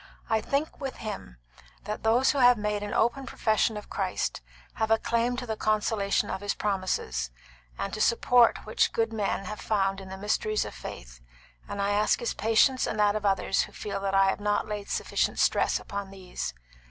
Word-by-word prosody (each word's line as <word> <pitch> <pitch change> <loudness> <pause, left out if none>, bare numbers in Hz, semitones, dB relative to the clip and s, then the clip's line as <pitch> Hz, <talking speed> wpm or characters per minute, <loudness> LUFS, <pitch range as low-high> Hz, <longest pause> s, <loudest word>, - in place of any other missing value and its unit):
I 220 -1 +3
think 285 +6 -2
with 270 -1 -4
him, 200 - -7 0.5
that 210 - -4
those 235 +4 +4
who 285 - -1
have 245 -1 +7
made 210 0 -1
an 205 0 -4
open 250 +3 +1
profession 220 -2 +1
of 210 - -9
Christ - - -2 0.3
have 220 0 -1
a 225 - +5
claim 235 +2 0
to 250 - -4
the 220 -2 -3
consolation 215 -1 +1
of 190 - -4
His 205 0 -1
promises, 185 - -1 0.5
and 195 - -3
to - - -3
the - - +4
support 235 0 +4
which 215 - +1
good 225 0 0
men 200 -2 -1
have 215 +2 -6
found 195 -2 0
in 190 - -10
the 190 - -7
mysteries 215 +1 0
of - - -7
faith; - - -9 0.5
and 200 - -5
I 200 0 +1
ask 210 +1 +2
his 235 - -2
patience 225 +4 +3
and 220 - -3
that 205 0 +4
of 210 -1 0
others 195 0 +2
who - - -5
feel 200 -1 -4
that 195 0 -1
I 195 0 +5
have - - -5
not 205 0 0
laid 210 -1 -5
sufficient - - 0
stress - - +2
upon 200 -1 -6
these. 185 - -6
210 Hz, 200 wpm, -28 LUFS, 195-225 Hz, 0.5 s, have